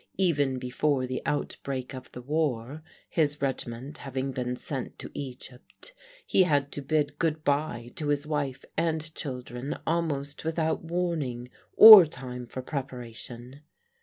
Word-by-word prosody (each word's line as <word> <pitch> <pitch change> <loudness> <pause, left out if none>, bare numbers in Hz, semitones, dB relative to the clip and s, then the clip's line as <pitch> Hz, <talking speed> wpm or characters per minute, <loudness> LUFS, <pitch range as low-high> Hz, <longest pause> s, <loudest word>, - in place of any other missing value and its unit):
Even 145 -8 +2
before 130 +2 0
the 130 0 -4
outbreak 135 -3 -3
of 130 -1 -9
the 125 - -9
war, 145 -1 -1 0.3
his 150 -3 0
regiment 135 +1 -4
having 135 0 -3
been 125 -1 -3
sent 130 0 -6
to - - -9
Egypt, 130 - -9 0.3
he - - +3
had 145 -5 +2
to 145 - -5
bid 145 +1 -1
good 160 -2 0
bye 140 -5 -1
to 150 - -3
his 145 0 0
wife 140 -3 -3
and 160 -1 -1
children, 125 -2 -5
almost 145 -4 -2
without 160 0 -1
warning 160 -8 -2 0.3
or 215 -4 +13
time 125 -3 -7
for 130 +2 -6
preparation. 125 -1 -7
140 Hz, 135 wpm, -28 LUFS, 125-155 Hz, 0.3 s, or